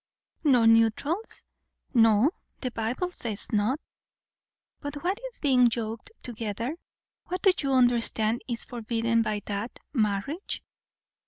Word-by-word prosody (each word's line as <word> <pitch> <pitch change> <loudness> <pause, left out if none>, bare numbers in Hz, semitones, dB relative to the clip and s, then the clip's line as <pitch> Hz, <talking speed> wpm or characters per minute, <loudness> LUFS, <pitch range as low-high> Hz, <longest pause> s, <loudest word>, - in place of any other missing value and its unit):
"No 255 -7 +5
neutrals?" 230 - +2 0.5
"No. 225 +3 +5 0.3
The 255 - -2
Bible 235 +11 -2
says 230 - -4
not." 220 +6 +1 1.0
"But 285 0 -5
what 375 +4 0
is - - -11
being 255 -4 +5
'yoked 225 -1 -4
together'? 230 +3 -3 0.5
what 365 +1 -4
do 385 - +7
you 275 -2 0
understand 240 -2 +2
is 235 -2 -3
forbidden 230 -1 0
by 215 -2 -1
that? 205 +3 -4 0.2
Marriage?" 225 - -1
235 Hz, 115 wpm, -27 LUFS, 220-275 Hz, 1.0 s, do